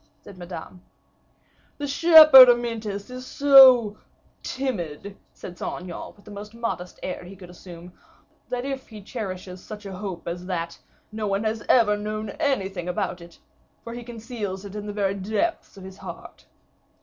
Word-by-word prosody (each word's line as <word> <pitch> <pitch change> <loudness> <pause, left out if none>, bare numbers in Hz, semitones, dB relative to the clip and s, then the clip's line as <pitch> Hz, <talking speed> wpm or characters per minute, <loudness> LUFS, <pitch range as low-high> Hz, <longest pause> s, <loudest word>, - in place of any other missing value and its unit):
said 200 - -13
Madame. 180 0 -9 1.0
"The 290 - -4
shepherd 305 -3 +9
Amyntas 230 -3 -1
is 255 0 -7
so 255 -6 +6 0.4
timid," 200 - -5 0.2
said 175 - -11
Saint - - -4
Aignan, 175 -2 -8
with 205 - -23
the - - -12
most 210 +2 -9
modest 230 -6 -5
air 180 - -5
he 185 +2 -11
could 180 -2 -13
assume, 175 0 -12 0.6
"that 250 0 -3
if 270 -1 -5
he 215 -3 -12
cherishes 185 -4 -7
such 210 -1 -10
a 195 - -7
hope 190 -4 -7
as 175 +1 -5
that, 170 -2 -4 0.3
no 215 -1 -4
one 200 +1 -1
has 220 -1 -2
ever 225 -4 +4
known 215 0 -5
anything 195 - -1
about 180 0 -3
it, 170 0 -14 0.5
for 230 - -8
he 240 - -7
conceals 225 -4 -6
it 200 0 -9
in 210 0 -6
the - - -4
very 200 -2 -1
depths 220 - -3
of 190 - -11
his 190 0 -11
heart." - - -11
205 Hz, 165 wpm, -24 LUFS, 185-240 Hz, 1.0 s, shepherd